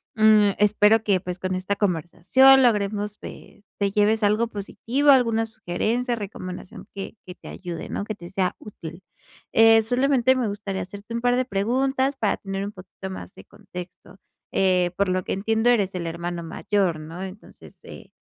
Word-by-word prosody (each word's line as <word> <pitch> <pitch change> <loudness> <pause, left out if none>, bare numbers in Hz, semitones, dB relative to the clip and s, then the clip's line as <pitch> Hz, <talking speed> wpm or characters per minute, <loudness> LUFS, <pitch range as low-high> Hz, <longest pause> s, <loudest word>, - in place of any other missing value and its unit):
Mm, 215 -1 +5
espero 210 +1 +4
que, 195 -4 +1
pues, 180 -1 -6
con 185 0 -2
esta 190 +2 -2
conversación 205 - +4
logremos, 210 -2 0
pues, 205 - -12 0.2
te 200 -1 +1
lleves 210 +2 +2
algo 215 +3 +2
positivo, 240 +7 0
alguna 230 -4 +3
sugerencia, 225 +4 -2
recomendación 185 -3 -8
que 200 +2 -7
que 180 - -8
te - - -14
ayude, 175 -3 -7
¿no? - - -4
Que 215 - -4
te 175 -3 -11
sea 190 -1 -1
útil. 175 -3 -10 0.5
Eh, 225 0 +6
solamente 260 +1 +3
me 240 -5 -1
gustaría 200 -1 -4
hacerte 200 +4 -9
un 235 - -2
par 245 0 +2
de 255 - +1
preguntas 265 +6 0
para 215 - +1
tener 195 0 -5
un 205 - -7
poquito 190 +1 -10
más 185 - -8
de - - -14
contexto. 185 -2 -11 0.4
Eh, 180 -2 +2
por 200 -1 +2
lo 185 0 0
que - - -6
entiendo, 220 +4 +1
eres 200 -6 +2
el 170 -2 -3
hermano 170 +1 -4
mayor, 180 -1 -1
¿no? 165 +4 -8
Entonces, 190 +2 -12
eh, - - -12
205 Hz, 175 wpm, -24 LUFS, 185-225 Hz, 0.5 s, Eh